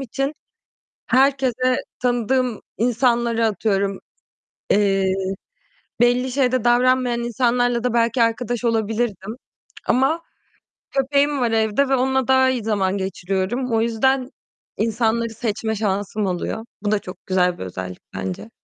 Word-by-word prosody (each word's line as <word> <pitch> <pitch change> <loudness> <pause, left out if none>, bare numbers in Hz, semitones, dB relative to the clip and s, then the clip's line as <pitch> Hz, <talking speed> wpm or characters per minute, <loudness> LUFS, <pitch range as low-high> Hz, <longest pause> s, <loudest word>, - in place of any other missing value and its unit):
için 275 +3 -2 0.7
herkese 255 -1 +2 0.2
tanıdığım 245 -1 0 0.2
insanlara 235 0 +2
atıyorum, 200 -2 0 0.7
eee, 195 -2 +3 0.9
belli 245 +1 +3
şeyde 255 -3 +1
davranmayan 245 0 +3
insanlarla 245 0 +1
da 250 -2 0
belki 235 0 +3
arkadaş 240 +1 -1
olabilirdim 225 -2 -1 0.5
ama 270 +7 +2 0.7
köpeğim 280 +1 +1
var 235 -2 +1
evde 225 +5 +2
ve 270 - +4
onunla 265 0 +1
daha 260 0 +4
iyi 250 -4 -1
zaman 200 -3 0
geçiriyorum. 195 +6 -2
O 225 - +3
yüzden 255 +3 +1 0.5
insanları 230 +1 0
seçme 220 -1 -3
şansım 205 0 -1
oluyor. 190 +4 -3 0.2
Bu 210 0 -1
da 210 - +2
çok 185 - -11
güzel 180 -1 +2
bir - - -6
özellik 90 0 -6 0.2
bence. 95 - -5
235 Hz, 120 wpm, -21 LUFS, 210-255 Hz, 0.9 s, ve